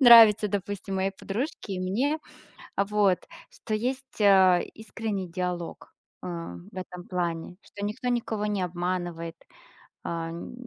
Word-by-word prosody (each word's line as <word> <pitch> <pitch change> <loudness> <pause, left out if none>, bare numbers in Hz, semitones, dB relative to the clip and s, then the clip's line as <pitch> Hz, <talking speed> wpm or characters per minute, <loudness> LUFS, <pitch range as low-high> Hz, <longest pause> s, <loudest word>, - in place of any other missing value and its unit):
нравится, 225 -4 +10
допустим, 200 -1 -3
моей 190 +1 +1
подружке 205 +3 -4
и 185 - -3
мне. 245 +12 +1 0.6
А, 200 - +3
вот. 200 -2 +3 0.3
Что - - -4
есть, 255 +3 -3
а, 190 -3 +7
искренний 220 -3 -3
диалог, 175 0 -4 0.3
а, 170 - -5 0.2
в - - -16
этом 180 -1 -6
плане. 175 -1 -2
Что 205 - -7
никто 210 +4 -3
никого 225 -3 0
не 205 -2 0
обманывает. 175 -1 -2 0.7
Ам, 165 +2 -4
195 Hz, 130 wpm, -28 LUFS, 180-215 Hz, 0.7 s, нравится